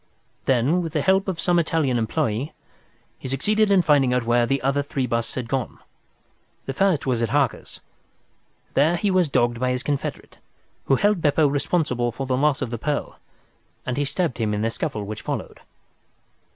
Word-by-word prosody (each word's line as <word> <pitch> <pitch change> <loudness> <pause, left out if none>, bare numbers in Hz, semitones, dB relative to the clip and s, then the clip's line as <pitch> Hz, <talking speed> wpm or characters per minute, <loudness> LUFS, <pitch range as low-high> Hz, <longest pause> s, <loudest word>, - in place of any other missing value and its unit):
Then, 135 +7 +2
with 165 -2 -5
the 150 -4 0
help 190 +1 +3
of 185 -3 -3
some 175 -1 +2
Italian 155 -7 +1
employee, 115 +5 -1 0.7
he - - -7
succeeded 210 +11 +1
in 195 -3 +4
finding 140 -5 +3
out 125 - +1
where 120 0 +2
the 135 +2 +1
other 140 +1 +1
three 140 -2 -2
busts 115 -1 -2
had 125 -3 -4
gone. 130 -2 -3 0.9
The 135 - -3
first 190 -1 +1
was 125 -3 0
at 115 - 0
Harker's. - - -1 0.9
There 155 +5 +3
he 195 +3 0
was 185 -4 +2
dogged 120 -3 +1
by 130 0 0
his 125 0 -1
confederate, 145 -2 -4 0.5
who 135 - +3
held 205 +4 +2
Beppo 150 +1 +3
responsible 140 -4 0
for 135 +4 -5
the 130 -1 0
loss 140 +1 +1
of 120 - -5
the 120 - -4
pearl, 145 +3 -3 0.7
and 130 - -2
he 145 - 0
stabbed 155 0 -2
him 105 -2 0
in 105 - -2
the 115 - 0
scuffle 115 -4 -3
which 105 +1 -6
followed." - - -5
135 Hz, 185 wpm, -23 LUFS, 120-160 Hz, 0.9 s, in